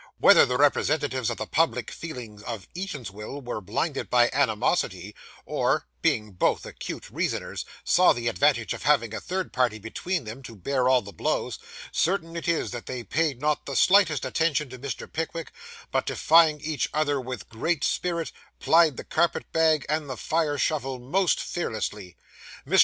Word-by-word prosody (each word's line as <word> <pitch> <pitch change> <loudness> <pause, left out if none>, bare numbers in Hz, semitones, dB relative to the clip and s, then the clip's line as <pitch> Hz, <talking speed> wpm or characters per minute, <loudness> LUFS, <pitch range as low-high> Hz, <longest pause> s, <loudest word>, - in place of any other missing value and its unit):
Whether - - +7
the 125 0 0
representatives 140 -2 +2
of - - -3
the 110 - -3
public 125 -5 0
feeling 120 -10 -8
of 110 -5 -6
Eatanswill 140 - -6
were 120 -3 -4
blinded 125 - -2
by 120 -1 +4
animosity, 105 - 0 0.3
or - - 0 0.2
(being 105 -1 +1
both 90 - 0
acute - - -7
reasoners) - - -2 0.2
saw 180 +1 +5
the 120 -1 -2
advantage 90 - +2
of - - -7
having 115 -1 +2
a - - -4
third 185 0 -3
party 125 -4 +1
between 145 - -3
them 115 +4 -8
to 120 -4 -10
bear 130 +6 0
all 130 -3 +4
the 100 - -9
blows, 80 - -2 0.3
certain 170 -2 0
it 170 - -4
is 170 -1 0
that 120 -1 -7
they 125 -2 -4
paid 150 -1 0
not 150 +1 0
the 140 - -4
slightest 175 -8 +4
attention 150 -1 0
to 130 - -9
Mr. 140 +1 -5
Pickwick, 160 0 -4 0.4
but - - 0
defying 160 -2 +5
each 155 -4 -1
other 145 -3 +1
with 130 0 -6
great 150 +8 -1
spirit, 170 -2 -1 0.3
plied 160 -4 +4
the - - -5
carpet 170 - 0
bag 160 -2 +3
and 150 -1 -1
the 130 - -4
fire 155 0 0
shovel 135 -3 -1
most 150 +7 +1
fearlessly. 105 - -4 0.5
Mr. - - +4
140 Hz, 170 wpm, -26 LUFS, 120-160 Hz, 0.5 s, Whether